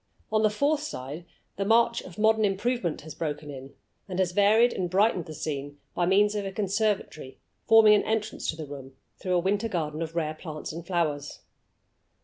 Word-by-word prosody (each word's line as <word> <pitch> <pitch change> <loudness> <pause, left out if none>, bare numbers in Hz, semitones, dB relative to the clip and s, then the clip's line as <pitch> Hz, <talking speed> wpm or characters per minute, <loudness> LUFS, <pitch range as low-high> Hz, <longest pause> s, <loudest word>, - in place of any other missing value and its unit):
On 215 0 +3
the 215 - +4
fourth 285 +8 +1
side 155 - -6 0.3
the 200 - 0
march 230 +3 +3
of 180 - -12
modern 220 0 +3
improvement 200 -2 0
has 160 +1 -9
broken 150 -2 -4
in, 135 0 -10 0.3
and 180 - -4
has 185 -2 +1
va 205 +3 +4
ried 240 +1 +5
and 180 -2 -2
brightened 190 -2 +2
the 155 - -7
scene 145 -2 -5 0.2
by 175 0 0
means 205 +2 +4
of 205 -1 -2
a 195 - -4
conservatory, 200 -8 -2 0.3
forming 225 -1 +8
an 210 - +4
entrance 220 -1 -2
to - - -1
the 160 -1 -6
room 135 -2 -9 0.3
through 185 - -2
a - - +4
winter 200 +5 0
garden 155 -4 -3
of 165 0 -4
rare 155 -2 -1
plants 155 -1 -7
and 170 +1 -8
flowers. 155 -6 -2
185 Hz, 195 wpm, -27 LUFS, 155-215 Hz, 0.3 s, forming